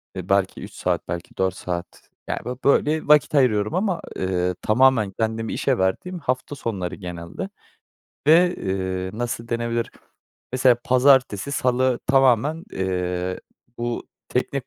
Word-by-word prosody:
eee, 90 0 -6
belki 100 -1 +1
3 - - -9
saat - - -2
belki 85 0 -6
4 95 -1 +1
saat 90 -1 -6 0.2
yani - - -1
bö 125 +1 -3
böyle 150 +2 +2
vakit 150 0 +5
ayırıyorum 110 -3 +3
ama, 185 -2 0
eee, 90 -1 -1
tamamen 115 -3 +3
kendimi 115 0 -1
işe - - +1
verdiğim, 135 - -1
hafta 130 0 -2
sonları 95 -9 -4
genelde 90 - -6 0.8
ve, 175 +4 +6
eee, 95 -1 -2
nasıl 115 -1 -3
denebilir? 115 0 -1 0.6
Mesela 130 -1 +4
pazartesi, 130 -1 +3
salı 125 -1 +1
tamamen, 135 +4 +3
eee, 90 -1 -2 0.4
bu, 120 0 -3 0.2
teknik - - -2
115 Hz, 130 wpm, -23 LUFS, 95-135 Hz, 0.8 s, ve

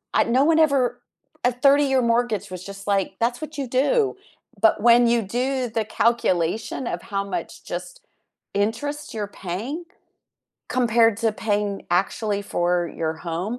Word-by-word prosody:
I - - +5
no 250 +4 +3
one 325 0 +4
ever 280 -6 +2 0.5
a 245 - +4
thirty-year 275 +1 +4
mortgage 230 -4 0
was 185 0 -7
just 195 0 -9
like, 195 -2 0
that's 240 +1 +1
what 310 0 -7
you 270 - -2
do, 395 - +2 0.5
but 215 - +4
when 240 +1 +6
you 235 0 +3
do 250 +4 -1
the 220 -1 -1
calculation 220 +1 0
of - - -3
how 195 - +1
much 200 -2 -6
just - - -6 0.5
interest 230 +9 -2
you're 210 -2 -2 0.2
paying 260 - -3 0.9
compared 230 -3 +3
to 225 -2 +1
paying 205 -2 -1
actually 200 +3 0
for 175 -2 0
your 160 -1 0
home. 185 +9 -3
230 Hz, 150 wpm, -23 LUFS, 200-255 Hz, 0.9 s, when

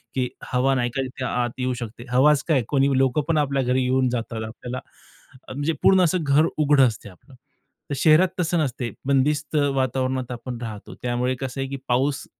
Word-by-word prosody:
की 125 -1 0 0.3
हवा 130 +2 +3
नाही 120 -1 0
का 135 - 0
तिथे 130 0 -5
आत 120 0 -2
येऊ 125 0 0
शकते. 120 +1 -7
हवाच 140 +3 +4
काय 145 -7 +2
कोणी 140 -1 +2
लोकं 135 +2 +2
पण 165 -2 +1
आपल्या 140 -2 +1
घरी 130 +1 +1
येऊन 130 0 +2
जातात 115 -2 -3
आपल्याला 125 +3 -6 0.7
अ, - - -9
म्हणजे 145 +4 -1
पूर्ण 190 -1 +6
असं 180 0 +3
घर 145 +2 +4
उघडं 145 -2 +4
असते 105 -2 -6
आपलं. 95 +9 -19 0.6
तर 145 - -2
शहरात 160 +6 +5
तसं 175 0 +1
नसते. 125 -4 -2
बंदिस्त 145 +2 +1 0.2
वातावरणात 130 -1 -1
आपण 120 0 -6
राहतो. 110 -4 -7
त्यामुळे 125 +1 -1
कसं 135 0 -4
आहे 135 - -2
की 140 - -4
पाऊस 135 +3 0
130 Hz, 190 wpm, -23 LUFS, 125-145 Hz, 0.7 s, पूर्ण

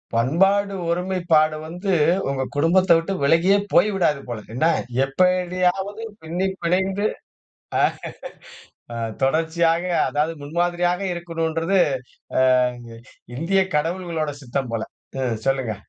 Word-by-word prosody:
பண்பாடு 195 +11 +2 0.2
ஒருமைப்பாடு 170 -3 +2
வந்து, 180 +4 -2 0.4
உங்க 135 -1 -1
குடும்பத்த 175 +5 +3
விட்டு 165 +4 -2
விலகியே 165 +7 +4 0.2
போய்விடாது 175 -7 +3
போல! 120 -3 -4
என்ன? 130 +6 +1 0.4
எப்படியாவது 185 +6 0 0.2
பின்னி 175 +4 -2 0.2
பிணைந்து 190 +4 +1 1.9
ஆ. - - -6 0.3
தொடர்ச்சியாக, 165 +3 +2 0.3
அதாவது 150 +3 0
முன்மாதிரியாக 175 +4 0
இருக்கணுன்றது, 165 +1 -1 0.6
அ - - +4 1.0
இங்கயே 190 +5 +2
கடவுள்களோட 165 -1 -2
சித்தம் 130 0 -3
போல. 110 - -1 0.4
ம் 120 -4 -1
சொல்லுங்க. 130 -5 0
170 Hz, 95 wpm, -22 LUFS, 150-185 Hz, 1.9 s, விலகியே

